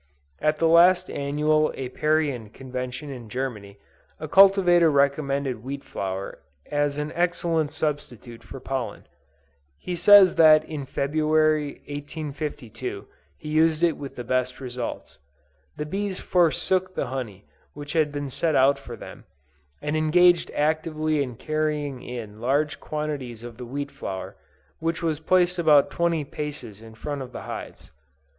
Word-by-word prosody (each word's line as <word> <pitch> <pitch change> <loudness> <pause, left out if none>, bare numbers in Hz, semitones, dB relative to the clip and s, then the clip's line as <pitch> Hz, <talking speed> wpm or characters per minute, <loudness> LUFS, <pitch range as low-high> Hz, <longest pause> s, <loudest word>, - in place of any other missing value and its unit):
At 155 0 +1
the 165 - +2
last 175 +3 +5
annual 150 +2 +1
Apiarian 135 -3 -1
Convention 130 +4 -6
in 120 -4 -9
Germany, 105 -6 -5 0.4
a - - -5
cultivator 190 -4 +6
recommended 140 -3 0
wheat 140 +2 -5
flour 95 0 -5 0.3
as 145 -1 0
an 150 +1 -3
excellent 170 -3 0
substitute 120 -6 -4
for 130 +4 -9
pollen. 125 -5 -4 0.7
He 180 - -5
says 190 +1 +7
that 155 -1 +7
in 145 -4 -6
February, 155 +1 +1
1852, 145 -6 -6 0.3
he 150 - -8
used 160 +1 +2
it 170 -2 +3
with 140 -1 -8
the 120 - -6
best 130 +1 -1
results. 125 -2 -6 0.6
The 150 - -3
bees 195 +4 -3
forsook 185 +2 +1
the - - -1
honey 110 -7 -6 0.3
which 145 0 -7
had 155 -3 +2
been 145 -2 -4
set 160 +3 0
out 135 +1 +4
for 120 -3 -9
them, - - -11 0.6
and 150 - -1
engaged 175 +3 +4
actively 155 0 0
in 125 -4 -3
carrying 150 -1 -2
in 110 -3 -8
large 145 +5 0
quantities 145 -7 -5
of 120 -1 -9
the 125 - -7
wheat 140 +3 -4
flour, 95 -9 -6 0.4
which 165 +1 -2
was 160 -3 0
placed 180 +2 +2
about 150 -4 +5
twenty 170 -2 0
paces 135 -8 -7
in 110 -1 -13
front 145 +4 -5
of 130 -1 -7
the - - -7
hives. - - -8
145 Hz, 140 wpm, -25 LUFS, 130-155 Hz, 0.7 s, says